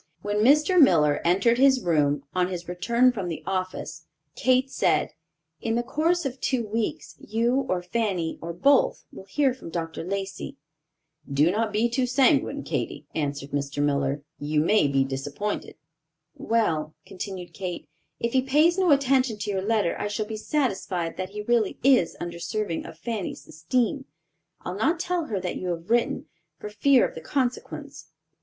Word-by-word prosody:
When 205 0 -1
Mr. 300 - +5
Miller 150 - +5
entered 195 +8 +3
his 265 -2 +5
room, 145 -4 +2
on 180 -1 +2
his 180 -2 -6
return 235 +8 +2
from 200 -7 -4
the 165 - -5
office, 185 0 -4 0.3
Kate 260 +1 +2
said, - - +1 0.5
"In 225 0 -1
the 240 - 0
course 330 +5 0
of 265 -1 -4
two 250 -4 0
weeks, 220 +1 -3
you 240 +5 0
or 180 -1 0
Fanny 180 -4 -2
or 170 - -4
both, 265 +12 +3
will 190 - -11
hear 265 +7 +1
from 255 -9 -10
Dr. 165 -1 -4
Lacey." 195 -3 -4 0.7
"Do 150 +5 +3
not 220 +2 0
be 215 +3 +2
too 250 +2 0
sanguine, 255 +2 +2
Katy," - - -3
answered 140 -2 -3
Mr. 140 0 -3
Miller: 140 0 0 0.2
"you 150 +1 0
may 185 0 +3
be 135 -1 +2
disappointed." 140 +9 -4 0.6
"Well," 160 -10 0
continued 190 -2 -7
Kate, 185 -3 -5 0.3
"if 235 0 -2
he 260 - +4
pays 305 +7 +3
no 370 -2 +3
attention 265 -5 +3
to 205 0 -3
your 190 -1 -1
letter, 210 -3 +1
I - - -1
shall 210 +1 -2
be 220 +1 -5
satisfied 195 - -1
that 185 0 -3
he 210 +1 -6
really 230 -2 +1
is 255 -11 +4
undeserving 175 +2 -4
of 160 - -11
Fanny's 210 +2 -5
esteem. 245 - -1 0.6
I'll 180 - -5
not 315 - +1
tell 360 -2 -1
her 210 -8 -2
that - - -3
you 185 - -5
have 170 +3 -4
written, 240 0 +1 0.3
for 210 - -7
fear 255 +5 +4
of - - -12
the 160 - -8
consequence." 255 - -3
210 Hz, 165 wpm, -25 LUFS, 170-255 Hz, 0.7 s, Mr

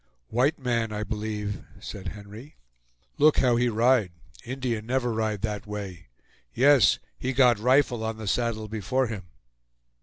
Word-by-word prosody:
"White 130 +6 +2
man, 120 -4 -1
I 105 0 -3
b'lieve," 105 -2 -4 0.2
said 100 - -8
Henry; 105 +7 -10 0.6
"look 150 +1 +5
how 125 -2 +4
he 120 +1 +2
ride! 115 -3 +3 0.3
Indian 120 -3 -3
never 125 -1 0
ride 110 -2 -2
that 105 -2 -3
way. 100 -5 -7 0.5
Yes; 135 -4 +5 0.2
he 130 - -2
got 125 -4 +4
rifle 125 -1 +3
on 110 0 -3
the 110 - -7
saddle 110 +2 -1
before 110 +5 -1
him." 105 -6 -6
115 Hz, 145 wpm, -26 LUFS, 105-125 Hz, 0.6 s, look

